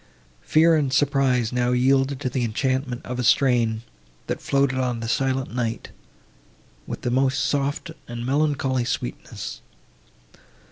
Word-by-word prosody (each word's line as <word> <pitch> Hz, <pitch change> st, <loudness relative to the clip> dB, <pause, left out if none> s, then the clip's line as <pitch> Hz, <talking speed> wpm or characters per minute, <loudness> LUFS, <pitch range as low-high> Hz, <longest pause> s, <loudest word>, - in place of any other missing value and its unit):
Fear 160 Hz, +1 st, +4 dB
and 140 Hz, -4 st, 0 dB
surprise 130 Hz, -4 st, +2 dB
now 125 Hz, 0 st, +1 dB
yielded 135 Hz, +2 st, +2 dB
to 130 Hz, -, -1 dB
the 125 Hz, -1 st, -1 dB
enchantment 130 Hz, +2 st, -1 dB
of 125 Hz, 0 st, -4 dB
a -, -, 0 dB
strain, 115 Hz, -3 st, +3 dB, 0.4 s
that -, -, -3 dB
floated 140 Hz, -1 st, +1 dB
on 125 Hz, -2 st, -1 dB
the 115 Hz, -, -4 dB
silent 130 Hz, 0 st, 0 dB
night, 115 Hz, -2 st, -3 dB, 1.0 s
with -, -, -5 dB
the 120 Hz, -, 0 dB
most 130 Hz, +2 st, +2 dB
soft 145 Hz, +3 st, -1 dB, 0.2 s
and 120 Hz, 0 st, -5 dB
melancholy 135 Hz, -2 st, +1 dB
sweetness. 60 Hz, -, -5 dB
130 Hz, 135 wpm, -24 LUFS, 120-140 Hz, 1.0 s, Fear